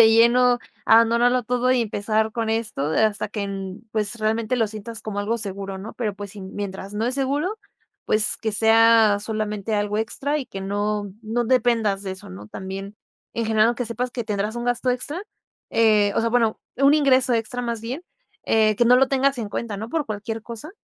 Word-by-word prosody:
de 225 - +9
lleno, 240 +2 +5 0.3
abandonarlo 235 +2 +4
todo 250 +2 +1
y 255 - +2
empezar 220 0 0
con 225 -1 -2
esto 220 -10 -1
hasta 215 +3 +1
que 210 0 -4
n 195 0 -5
pues, 215 +1 -2
realmente 220 +2 0
lo 225 -2 +2
sientas 220 +1 -7
como 210 -2 -5
algo 210 +3 0
seguro, 195 -2 -5
¿no? 205 +4 -8
Pero, 215 -5 -2
pues, 205 0 -8
si, 205 0 -10
mientras 195 +1 -6
no 215 +2 -1
es 250 - -1
seguro, 285 +10 -1 0.5
pues, 215 0 +4
que 220 - -3
sea 225 0 +5
solamente 215 0 -3
algo 205 +1 0
extra 280 +6 -1
y 270 - -5
que 195 - -7
no 205 0 -2
no 230 +2 -1
dependas 225 -5 +2
de 190 -1 -4
eso, 190 - -11
¿no?, 100 +3 -10
también. 195 - -7 0.4
En 230 - -1
general, 220 +2 +3
que 245 - -3
sepas 240 +2 -3
que 240 -3 -4
tendrás 210 0 -2
un 240 - -3
gasto 245 +1 -1
extra, 290 +9 -3 0.5
eh, 210 -3 +4
o - - +2
sea, 230 - +1
bueno, 230 -2 +1 0.2
un 275 +3 +5
ingreso 260 -4 +3
extra 230 +2 -2
más 235 -2 -3
bien, 250 +8 -5 0.4
eh, 215 -1 +3
que 240 - +3
no 245 - +6
lo 265 +1 +4
tengas 270 0 +2
en 220 -3 -3
cuenta, 215 0 -4
¿no?, 220 +3 -6
por 315 +2 -2
cualquier 220 +1 -4
cosa. 235 +7 -8
225 Hz, 200 wpm, -23 LUFS, 205-240 Hz, 0.5 s, de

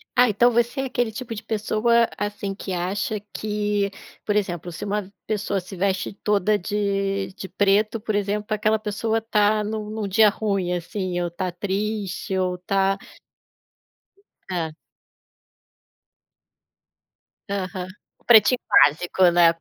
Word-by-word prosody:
Ah, 245 -1 +6
então 240 +4 +4
você 235 +3 +1
é - - -2
aquele 245 -3 -1
tipo 235 +2 -6
de 215 - -6
pessoa, 225 +1 +2
assim, 205 -1 -3
que 195 -1 -6
acha 195 +4 -2
que, 210 -1 -1 0.4
por 210 - 0
exemplo, 175 -4 -1
se 165 - -7
uma 205 -1 -2 0.2
pessoa 205 -2 -1
se 185 +2 -10
veste 190 +1 0
toda 205 0 +1
de 195 0 -1
de 190 - -7
preto, 205 +4 +2
por 215 0 -3
exemplo, 205 +1 -1
aquela 215 +1 +2
pessoa 220 +1 -1
está 215 -1 +2
num 210 0 -4
num 215 -1 -3
dia 215 +2 +6
ruim, 200 -4 -1
assim, 180 +1 -3
ou 175 - 0
está 175 +2 -3
triste 200 +1 -3
ou 185 -1 0
está 195 +2 +1 1.5
Tá. 170 -4 -2 2.8
Aham. 185 -2 -3 0.3
O - - -30
pretinho 235 +2 +6
básico, 175 +5 +4
né, 170 -1 +6
205 Hz, 135 wpm, -23 LUFS, 190-215 Hz, 2.8 s, Ah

